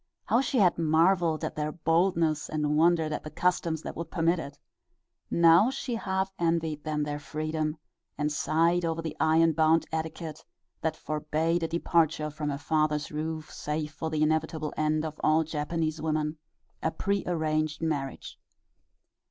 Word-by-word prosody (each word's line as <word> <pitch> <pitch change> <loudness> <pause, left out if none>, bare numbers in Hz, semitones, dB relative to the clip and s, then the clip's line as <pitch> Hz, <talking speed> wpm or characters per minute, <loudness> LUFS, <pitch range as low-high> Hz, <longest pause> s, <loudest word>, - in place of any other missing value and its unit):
How 235 - +3
she 270 - -1
had 180 -6 +4
marveled 165 +1 +3
at - - -5
their 150 0 -2
boldness 165 -1 +1
and 150 -1 0
wondered 160 -1 +3
at - - -4
the 155 - -6
customs 165 -1 0
that - - -6
would 165 -1 -5
permit 170 0 +1
it! 140 -2 -7 0.7
Now 170 +6 +6
she 265 -2 -4
half 190 -3 -1
envied 165 -3 0
them 150 -1 -1
their 145 0 -3
freedom, 155 +1 -3 0.4
and 150 0 0
sighed 165 +4 +2
over 165 0 -1
the 160 - -4
iron 165 +1 +4
bound 160 +1 +3
etiquette 160 0 -4 0.4
that 160 -1 -1
forbade 155 +3 -1
a 165 - 0
departure 160 -2 +1
from 150 0 -3
her 140 - -2
father's 155 -1 0
roof 155 +1 -4
save 150 0 -3
for 160 +2 -4
the 155 -1 +1
inevitable 155 0 0
end 155 0 +1
of 155 -1 -6
all 155 +1 +4
Japanese 155 0 -2
women 155 0 -1 0.4
a - - +1
prearranged 155 -6 -1
marriage. 145 -5 -3
160 Hz, 155 wpm, -28 LUFS, 155-165 Hz, 0.7 s, Now